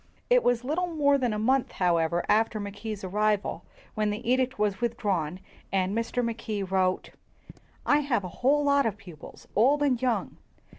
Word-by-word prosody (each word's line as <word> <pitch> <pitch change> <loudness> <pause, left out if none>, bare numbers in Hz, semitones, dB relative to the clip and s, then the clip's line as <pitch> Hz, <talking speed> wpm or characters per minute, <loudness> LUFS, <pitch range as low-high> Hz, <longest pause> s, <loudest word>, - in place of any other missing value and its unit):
It - - +6
was 245 - +1
little 320 +7 -1
more 285 -4 +2
than 250 -3 0
a 210 - -2
month, 255 +5 +1
however, 170 -2 +1
after 220 0 +2
Mackay's 205 +1 -6
arrival 210 +2 -1 0.3
when 215 -1 0
the 215 +3 -5
edict 255 +1 +1
was 210 -1 0
withdrawn, 195 -8 -1 0.3
and 195 +1 0
Mr. 230 +2 -1
Mackay 225 -3 -3
wrote: 185 -1 0 0.7
"I 290 - +4
have 270 -8 0
a - - -4
whole 290 +4 +3
lot 280 -2 +3
of 210 -2 -3
pupils, 175 -7 -13
old 275 +7 +4
and 260 -4 +1
young. 250 -3 -1
225 Hz, 165 wpm, -27 LUFS, 200-260 Hz, 0.7 s, It